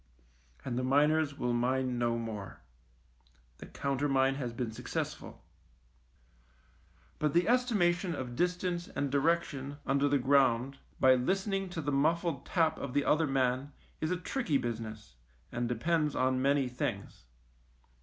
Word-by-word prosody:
And 125 -1 -2
the - - -2
miners 145 +2 +2
will 125 0 -1
mine 125 +1 0
no 120 -1 +1
more. 110 -4 -6 1.0
The - - -9
countermine 135 -1 +1
has 130 -3 -4
been 115 -1 -3
successful. 110 - -5 1.8
But 150 0 0
the 175 - +3
estimation 200 -8 +2
of 125 -3 -5
distance 180 +2 -1
and 140 -2 -3
direc 165 +5 +3
tion 140 +1 -7
under 140 +1 +2
the 145 - +3
ground 135 -1 +2 0.2
by 130 0 +6
listening 195 - 0
to 175 -2 -4
the 145 -1 -2
muffled 160 +1 0
tap 160 -2 +1
of 140 -1 -5
the 145 - +2
other 155 +1 +3
man 135 +1 0 0.3
is 155 - -1
a 180 - 0
tricky 180 - -1
business, 110 - -6 0.3
and 120 0 -2
depends 150 +5 0
on 130 0 +1
many 140 0 +2
things. 115 - -4
140 Hz, 140 wpm, -31 LUFS, 125-160 Hz, 1.8 s, by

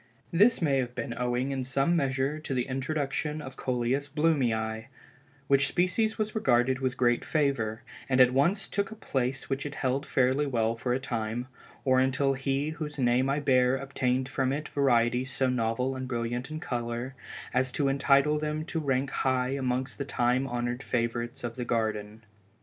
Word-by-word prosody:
This 205 +3 +4
may 140 -4 +3
have 125 -1 -3
been 120 -1 -3
owing 125 +2 -1
in 135 -1 -2
some 135 +6 +1
measure 135 0 0
to 145 -3 -4
the 125 -1 0
introduction 145 +2 -2
of 135 -3 -8
Coleus 130 +3 -1
Blumei, 120 -8 0 0.6
which 140 0 +4
species 215 +5 +1
was 215 0 -1
regarded 130 - +2
with 130 -1 -1
greater 120 -1 +2
favor, 135 -8 0 0.3
and 130 -1 +2
at 125 0 +6
once 170 +10 +2
took 200 0 -1
a 220 - -8
place 135 - -2
which 135 0 -2
it 145 -1 -6
held 135 +2 -1
fairly 130 +3 +2
well 115 -3 +1
for 125 +2 -3
a - - -1
time, 120 -2 -3 0.4
or 130 -1 +4
until 135 +1 +2
he 135 +2 -1
whose 155 -2 -6
name 125 0 +2
I 140 +2 +1
bear 130 -2 +3
obtained 130 -1 -1
from 135 -1 0
it 150 +2 -3
varieties 125 -1 +2
so 130 0 +1
novel 125 +2 0
and 130 0 -4
brilliant 120 +1 -3
in 155 0 -5
color, 120 -4 -3 0.4
as 130 +1 +1
to 145 - +1
entitle 140 +2 +3
them 155 +1 -2
to 165 - -3
rank 135 -2 0
high 130 -2 +1
amongst 130 -1 -2
the - - 0
time 130 0 +1
honored 120 0 -2
favorites 120 0 -2
of 120 0 -4
the 125 - -2
garden. 110 -2 -2
130 Hz, 180 wpm, -28 LUFS, 125-140 Hz, 0.6 s, at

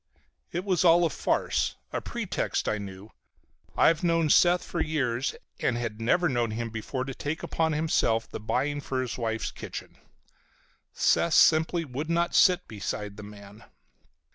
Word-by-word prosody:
It 180 +3 -3
was 185 -3 +1
all 170 0 +6
a 160 - 0
farce, - - 0 0.2
a - - -1
pretext, - - -3
I 110 - 0
knew. 100 +1 -9 0.7
I've 165 0 +4
known 165 -3 +2
Seth 175 0 +5
for 170 - -3
years 140 -5 -1 0.2
and 120 - 0
had 115 -2 -4
never 175 +10 +2
known 120 -5 0
him 115 +1 -4
before 115 +4 -4
to 135 0 -5
take 150 +5 -4
upon 160 -1 0
himself 150 -7 +1
the - - -7
buying 140 +7 -1
for 135 -1 -3
his 125 - -4
wife's 115 -1 -2
kitchen. - - -8 1.0
Seth 170 - +2
simply 165 +1 +4
would 145 +4 -5
not 170 +1 +1
sit 180 -1 +4
beside 105 -1 -5
the 105 - -9
man. 105 0 -12
135 Hz, 160 wpm, -27 LUFS, 110-165 Hz, 1.0 s, all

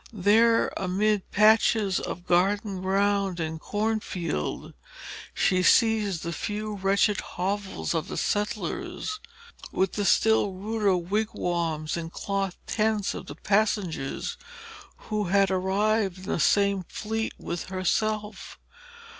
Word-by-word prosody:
There, 225 +3 +3
amid 200 +2 0
patches 215 -2 +4
of 175 - -6
garden 195 +2 +1
ground 195 -1 +1
and 160 -1 -3
cornfield, 210 -3 -3 0.6
she 185 -2 +2
sees 210 -3 +3
the 170 - -4
few 210 +5 -4
wretched 200 +1 +2
hovels 195 +1 -3
of 165 -2 -1
the - - -5
settlers, 215 - -2 0.5
with 190 -1 +1
the 205 - -1
still 220 -2 +3
ruder 205 0 0
wigwams 170 -5 -2
and 165 -1 -5
cloth 195 -1 -3
tents 215 -2 0
of - - -8
the - - -7
passengers 200 -9 -1 0.7
who 210 -1 0
had 195 +1 +3
arrived 195 +1 +1
in 185 - -12
the 185 - -2
same 200 +1 +3
fleet 220 +1 -3
with 170 - -4
herself. 210 +3 -2
200 Hz, 115 wpm, -26 LUFS, 185-215 Hz, 0.7 s, patches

